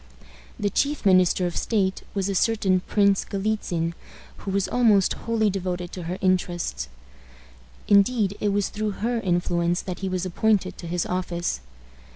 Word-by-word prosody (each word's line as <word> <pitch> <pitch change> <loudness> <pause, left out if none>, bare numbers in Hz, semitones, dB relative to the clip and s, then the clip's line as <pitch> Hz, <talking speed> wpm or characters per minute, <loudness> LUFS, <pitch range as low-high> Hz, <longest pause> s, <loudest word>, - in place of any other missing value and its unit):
The 205 -1 0
chief 285 +3 0
minister 185 -1 +4
of 175 - -3
state 195 -4 0
was 195 -1 0
a 200 - -1
certain 195 -2 +2
Prince 200 +1 +2
Galitzin, 195 -5 -2 0.4
who - - -7
was 195 0 0
almost 215 -6 +3
wholly 220 -2 0
devoted 180 -2 -3
to 180 - -6
her 180 - -3
interests. 175 - 0 1.0
Indeed, 205 0 +3
it 210 - +1
was 200 0 0
through 215 -1 -2
her 240 0 0
influence 175 -2 0
that 180 -2 -5
he 195 - -2
was 185 0 -2
appointed 190 +1 +1
to 170 - -7
his 175 +1 -1
office. 175 - -2
190 Hz, 155 wpm, -24 LUFS, 180-205 Hz, 1.0 s, minister